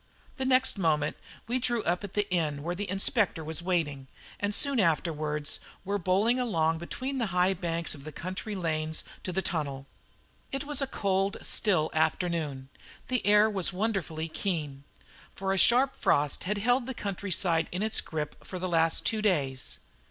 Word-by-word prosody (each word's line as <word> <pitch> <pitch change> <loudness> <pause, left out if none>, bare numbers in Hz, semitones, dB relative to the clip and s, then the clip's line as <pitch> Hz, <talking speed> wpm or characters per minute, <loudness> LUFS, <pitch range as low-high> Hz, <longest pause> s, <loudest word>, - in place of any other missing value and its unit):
The 265 - -1
next 260 -5 +4
moment 150 -4 +1 0.3
we 245 +3 0
drew 240 -3 +1
up 175 +3 0
at 200 - -7
the 205 -1 +1
inn 150 -5 0
where 175 +2 -2
the 200 +2 -4
Inspector 195 - +1
was 160 +2 -2
waiting, 160 -7 -1 0.3
and 205 0 0
soon 275 +4 +2
afterwards 155 -4 +1 0.3
were 200 +1 -1
bowling 200 +7 +2
along 165 -9 +1
between 260 +10 -4
the 235 - +1
high 180 +1 +2
banks 170 -2 -1
of 140 -3 -10
the 155 - -7
country 185 +6 -5
lanes 160 -3 -1 0.2
to 185 - -4
the 190 +2 -1
tunnel. 140 -5 -2 0.7
It 275 +1 -2
was 290 -1 -1
a 275 - 0
cold, 195 -4 0
still 180 -8 +2
afternoon; 155 -4 0 0.4
the 255 -1 0
air 210 +1 +6
was 195 -4 0
wonderfully 185 -5 -1
keen, 150 -6 -3 0.5
for 195 0 -1
a 195 - +1
sharp 255 +6 +5
frost 145 +2 +1
had 205 +3 0
held 245 +4 +2
the 260 - -4
countryside 185 -4 0
in 180 +4 -2
its 220 0 +1
grip 150 -2 -5
for 185 - -6
the 185 +1 -2
last 165 -2 +2
two 220 -1 +1
days. 140 - 0
180 Hz, 175 wpm, -29 LUFS, 160-210 Hz, 0.7 s, air